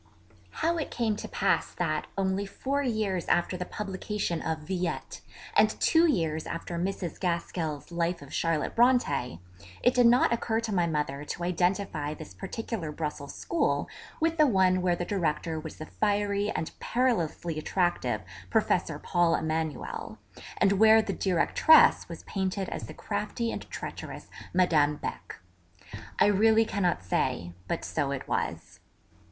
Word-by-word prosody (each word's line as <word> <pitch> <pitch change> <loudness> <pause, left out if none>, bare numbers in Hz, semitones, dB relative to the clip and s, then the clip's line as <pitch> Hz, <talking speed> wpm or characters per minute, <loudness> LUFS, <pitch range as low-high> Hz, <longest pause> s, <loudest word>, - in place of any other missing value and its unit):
How 335 +1 +2
it 300 - -3
came 225 -3 0
to - - -6
pass - - 0
that, - - -1
only 195 +1 0
four 275 +7 -2
years 215 -8 -1
after 175 +1 +2
the 180 0 -4
publication 195 -3 -3
of 160 -1 -2
Villette, 180 -2 -3 0.3
and - - +4
two 330 +1 +4
years 160 - -1
after 170 0 -4
Mrs. 180 -2 -3
Gaskell's 170 -4 -2
Life 170 -1 -1
of 140 - -12
Charlotte 165 -2 0
Brontë, 230 - +2 0.5
it 245 - +5
did 245 -1 +5
not 240 0 +5
occur 225 -1 0
to 230 -1 -3
my 175 -3 +2
mother 150 -3 -2
to 170 - -5
identify 175 -4 0
this 155 - -10
particular 195 -4 -5
Brussels 150 -2 -5
school 340 - 0 0.3
with 325 +1 +1
the 305 - +7
one 185 -5 +3
where 180 -1 +2
the 175 - -3
Director 165 -4 -1
was 155 0 -8
the 155 - -7
fiery 205 +1 0
and 160 - -3
perilously 175 -10 0
attractive 150 - 0 0.3
'Professor - - +1
Paul 175 -1 +2
Emanuel' 160 -2 -3 0.4
and 195 - +4
where 220 0 +7
the - - -3
Directress 190 - +5
was - - -8
painted 190 0 -2
as - - -5
the - - -9
crafty 235 -1 -3
and - - -6
treacherous - - -7 0.2
'Madame 155 -5 +3
Beck,' - - -6 0.8
I - - +5
really 220 +2 +4
cannot 185 - 0
say; 85 -1 -1
but, - - -2
so - - -1
it - - -4
was. - - -3
180 Hz, 150 wpm, -28 LUFS, 160-215 Hz, 0.8 s, the